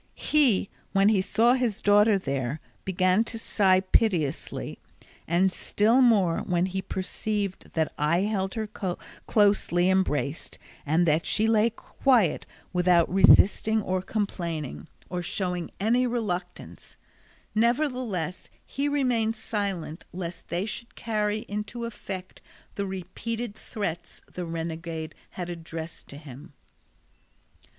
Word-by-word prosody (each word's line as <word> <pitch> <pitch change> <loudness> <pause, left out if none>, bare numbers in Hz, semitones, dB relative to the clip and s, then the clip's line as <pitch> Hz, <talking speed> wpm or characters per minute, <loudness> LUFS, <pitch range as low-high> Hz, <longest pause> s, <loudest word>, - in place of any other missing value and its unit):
He, 260 -11 +3 0.2
when 195 +1 +5
he 205 -3 +3
saw 225 +5 +3
his 245 -5 0
daughter 205 +1 +5
there, 135 -4 -2 0.3
began 185 +2 +2
to 230 - -6
sigh 190 -4 +3
piteously, 185 -7 0 0.5
and 180 +3 +3
still 225 +7 +2
more 200 -9 +4
when 175 0 0
he 190 0 -3
perceived 195 +1 -3
that 160 -1 0
I 160 +4 +2
held 195 -2 -1
her 220 -1 -2 0.6
closely 195 -4 +3
embraced 160 -5 -1 0.3
and 160 +4 +3
that 155 +1 +2
she 215 - +2
lay 220 0 +4
quiet 230 - +1 0.3
without 180 -1 +3
resisting 205 +3 +5
or 185 -1 -1
complaining, 170 - -3 0.2
or 180 -1 -3
showing 180 -1 -2
any 240 +5 +2
reluctance; 190 -7 -4 0.6
nevertheless 235 - 0 0.2
he 280 +1 -2
remained 245 -6 +1
silent 200 -7 -3
lest 175 -1 -6
they 175 +3 -2
should 235 +2 -6
carry 215 0 -1
into 210 +3 -4
effect 190 -5 -7 0.3
the 200 -1 -3
repeated 205 +5 -5
threats 175 -6 -5
the 180 - -6
renegade 165 -1 -5 0.2
had 180 -2 -6
addressed 165 -1 -7
to 140 - -10
him. 145 0 -12
190 Hz, 120 wpm, -27 LUFS, 175-220 Hz, 0.6 s, when